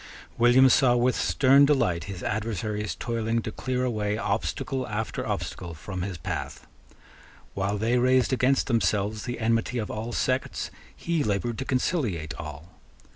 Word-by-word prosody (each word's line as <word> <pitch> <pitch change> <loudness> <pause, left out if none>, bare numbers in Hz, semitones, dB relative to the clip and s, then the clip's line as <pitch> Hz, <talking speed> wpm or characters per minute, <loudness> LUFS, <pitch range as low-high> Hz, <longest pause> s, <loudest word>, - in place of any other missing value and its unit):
William 120 +3 +6
saw 125 -1 +5
with 125 +1 +2
stern 135 +1 +4
delight 90 - +2
his 95 -3 -7
adversaries 105 -1 -2
toiling 115 -1 -1
to 110 - -4
clear 130 +2 -2
away 105 -3 -1
obstacle 115 +5 -2
after 110 0 -3
obstacle 85 -2 -4
from 95 +4 -6
his 95 -1 -4
path. 75 - -5 0.9
While 100 +1 -1
they 115 +4 +1
raised 130 +1 +3
against 130 +1 +2
themselves 105 -2 0
the 120 - -4
enmity 115 +2 0
of 110 -3 -3
all 110 +2 -4
sects, 130 +2 -1 0.2
he 170 -3 -1
laboured 110 +3 -1
to 135 - -3
conciliate 115 - -1
all. 80 +2 -9
115 Hz, 145 wpm, -26 LUFS, 100-125 Hz, 0.9 s, William